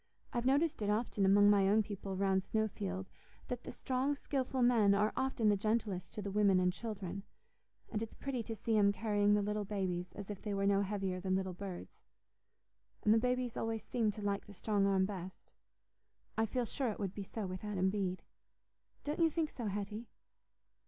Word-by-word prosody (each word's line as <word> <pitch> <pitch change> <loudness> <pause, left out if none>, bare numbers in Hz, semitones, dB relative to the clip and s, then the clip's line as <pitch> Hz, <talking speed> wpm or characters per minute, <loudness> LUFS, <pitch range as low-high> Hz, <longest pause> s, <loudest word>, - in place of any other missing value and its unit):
I've 240 +1 0
noticed 290 +1 +2
it 205 - 0
often 210 -2 +1
among 205 +1 +7
my 200 -1 +4
own 215 +2 +4
people 200 -2 -5
round 190 -1 +2
Snowfield, 195 -3 -2 0.4
that 245 -1 -4
the - - -5
strong, 265 +2 0
skilful 265 -2 -1
men 220 -5 +5
are 210 +2 +2
often 260 -4 +1
the 205 - +5
gentlest 210 -3 -1
to 210 - -4
the 200 - -3
women 200 -2 +4
and 180 0 +2
children; 200 -4 -5 0.7
and 215 - -1
it's 225 - -5
pretty 270 -3 -3
to 225 0 -5
see 225 +1 0
'em 200 -1 +5
carrying 205 -1 +2
the 205 - +2
little 210 +1 -1
babies 185 -3 -2
as 205 0 -6
if 200 - -7
they 205 -2 -2
were 195 0 +1
no 200 0 +4
heavier 195 -2 -2
than 185 0 0
little 190 -1 -1
birds. 185 -1 -7 1.0
And 210 - +5
the 225 - +5
babies 250 0 0
always 225 -1 -2
seem 230 -3 0
to 210 - -7
like 200 -1 -1
the 205 - -10
strong 200 +1 +1
arm 190 -1 +3
best. 190 -2 -7 0.8
I 225 0 +2
feel 245 +3 -1
sure 255 +2 -1
it 210 - -4
would 195 -3 -3
be 205 - -5
so 205 +2 -5
with 185 +1 -5
Adam 190 -3 +1
Bede. 190 -3 -2 0.8
Don't 295 +3 -3
you 330 -1 +5
think 315 -1 -1
so, 235 -4 -4
Hetty?" 205 +3 -4
205 Hz, 200 wpm, -35 LUFS, 195-225 Hz, 1.0 s, among